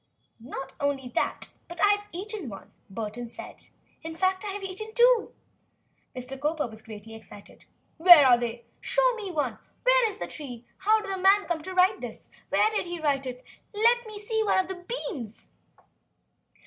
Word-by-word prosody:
"Not 270 +2 -7
only 280 -3 -1
that - - -1 0.2
but 345 0 -8
I 410 - +5
have 410 0 +2
eaten 390 - -5
one," 195 -2 -11 0.2
Burton 225 +3 -5
announced, - - -10 0.3
"in 325 0 -7
fact 375 +3 +1
I - - -4
have 400 0 -5
eaten 410 +3 -6
two." 485 -2 +5 0.8
Mr. 260 +2 -7
Cowper 300 +1 0
was 220 -2 -9
greatly 220 0 -10
excited. 220 -2 -14 0.3
"Where 335 -3 +9
are 250 -2 +7
they?" 240 - 0
he - - -10
exclaimed. 235 -1 -25
"Show - - +3
me 430 -4 -5
one! 295 -8 -2 0.2
Where - - +5
is 405 - -9
the - - -4
tree? 245 -6 -9
How 430 +3 +3
did 400 - -4
the 380 - -2
man 390 +2 +5
come 340 -2 -2
to 370 +4 -7
write 370 +2 +4
this? - - -8 0.2
Where 435 - +3
did 420 -4 -2
he 345 0 -5
write 280 -3 0
it? 250 0 -7 0.3
Let 470 +2 +3
me 430 - -9
look 410 +2 -10
at 440 -1 +2
one - - +3
of 375 -1 +2
the 370 +5 -5 0.2
beans!" 230 - -9
350 Hz, 195 wpm, -27 LUFS, 255-415 Hz, 0.8 s, Where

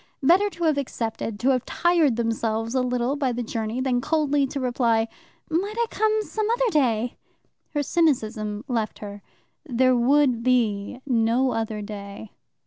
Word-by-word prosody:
Better 370 +8 +5
to 345 -2 -7
have 310 -3 +2
accepted, 225 -5 -4
to 260 - +3
have 255 -2 +2
tired 340 -7 +2
themselves 225 0 -1
a 260 - +2
little 250 +1 0
by 275 -3 0
the 240 0 -3
journey, 225 +1 -3
than 255 -2 0
coldly 290 -1 +1
to 275 - -4
reply, 235 -3 +1 0.4
"Might 380 +7 -1
I 470 - +2
come 435 0 +1
some 430 0 -2
other 480 0 +1
day?" 245 - +1 0.6
Her 290 - +1
cynicism 220 -9 0
left 230 -5 -2
her. 205 -1 -8 0.4
There 255 -3 +2
would 255 0 +3
be 235 -2 0
no 245 0 +2
other 220 -2 -3
day. 200 0 -8
250 Hz, 155 wpm, -24 LUFS, 225-290 Hz, 0.6 s, Better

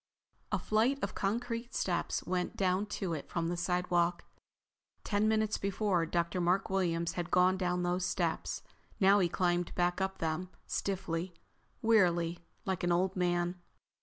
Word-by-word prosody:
A - - +2
flight 230 +6 +2
of 200 - -1
concrete 230 +3 -2
steps 175 -2 -1
went 180 0 -2
down 190 +1 +1
to 195 -4 -3
it 150 - -5
from 170 -1 -1
the 175 - -1
sidewalk. 175 0 +1 0.8
Ten 205 0 +1
minutes 215 -1 +1
before, 195 -3 0
Dr. 170 +2 0
Mark 180 +2 +1
Williams 170 -3 +1
had 175 -1 -4
gone 180 +1 +4
down 180 -1 0
those 175 +1 0
steps. 175 -2 -1 0.4
Now 200 0 +6
he 175 -3 +2
climbed 175 0 0
back 180 +1 +1
up 190 0 -1
them, 165 +3 -2 0.2
stiffly, 180 -2 -2 0.5
wearily, 175 -6 +3 0.3
like 190 -2 -2
an 175 - +2
old 185 +2 +2
man. 175 0 0
180 Hz, 150 wpm, -32 LUFS, 175-195 Hz, 0.8 s, Now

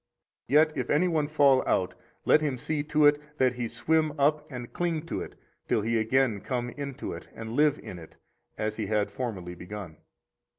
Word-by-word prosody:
Yet 155 +4 +5
if 125 -3 -3
any 165 +5 +3
one 155 -4 +1
fall 140 -3 +4
out, 90 - +1 0.3
let 155 - +5
him 145 -4 -1
see 150 +4 -1
to 150 0 +3
it 145 0 +5 0.2
that 130 -1 +3
he 120 -1 -3
swim 155 +5 +1
up 150 +2 +2
and 125 -2 -7
cling 170 -2 -1
to - - -3
it - - -8 0.3
till 105 - +1
he 115 +1 +1
again 115 -1 +2
come 120 0 -3
into 140 -2 -5
it - - -9
and 110 0 -6
live 150 +3 +3
in 90 - -9
it, 80 - -13 0.4
as 110 0 -2
he 110 -3 -2
had 105 -1 0
formerly 100 -6 -4
begun. 90 -2 -8
130 Hz, 195 wpm, -28 LUFS, 110-150 Hz, 0.4 s, Yet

